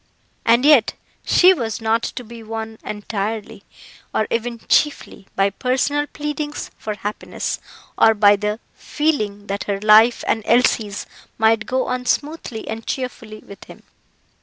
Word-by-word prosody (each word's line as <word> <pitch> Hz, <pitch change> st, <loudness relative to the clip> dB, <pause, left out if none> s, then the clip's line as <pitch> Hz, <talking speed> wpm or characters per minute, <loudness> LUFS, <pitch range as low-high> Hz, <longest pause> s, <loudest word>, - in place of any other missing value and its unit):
And 235 Hz, +3 st, +4 dB
yet 290 Hz, -7 st, +5 dB, 0.3 s
she 365 Hz, +1 st, +6 dB
was 230 Hz, -, -3 dB
not 225 Hz, 0 st, +1 dB
to 250 Hz, -, -5 dB
be 235 Hz, 0 st, -11 dB
won 220 Hz, 0 st, -6 dB
entirely, 210 Hz, 0 st, -4 dB, 0.5 s
or 215 Hz, -, +2 dB
even 235 Hz, +1 st, -2 dB
chiefly, 290 Hz, -9 st, 0 dB
by 195 Hz, 0 st, +2 dB
personal 265 Hz, +6 st, 0 dB
pleadings 295 Hz, 0 st, -5 dB
for 215 Hz, -1 st, -5 dB
happiness, 205 Hz, 0 st, -4 dB, 0.4 s
or 225 Hz, 0 st, +6 dB
by 205 Hz, -1 st, +6 dB
the 210 Hz, +2 st, -2 dB
feeling 215 Hz, -10 st, -2 dB
that 200 Hz, 0 st, -4 dB
her 200 Hz, -1 st, -2 dB
life 215 Hz, +3 st, +5 dB
and 225 Hz, -, +1 dB
Elsie's 225 Hz, -4 st, +2 dB, 0.3 s
might 220 Hz, 0 st, +2 dB
go 260 Hz, 0 st, 0 dB
on 250 Hz, 0 st, -3 dB
smoothly 290 Hz, -7 st, -2 dB
and 220 Hz, +1 st, -6 dB
cheerfully 230 Hz, -4 st, -5 dB
with 200 Hz, -, -12 dB
him. -, -, -14 dB
225 Hz, 140 wpm, -20 LUFS, 210-255 Hz, 0.5 s, she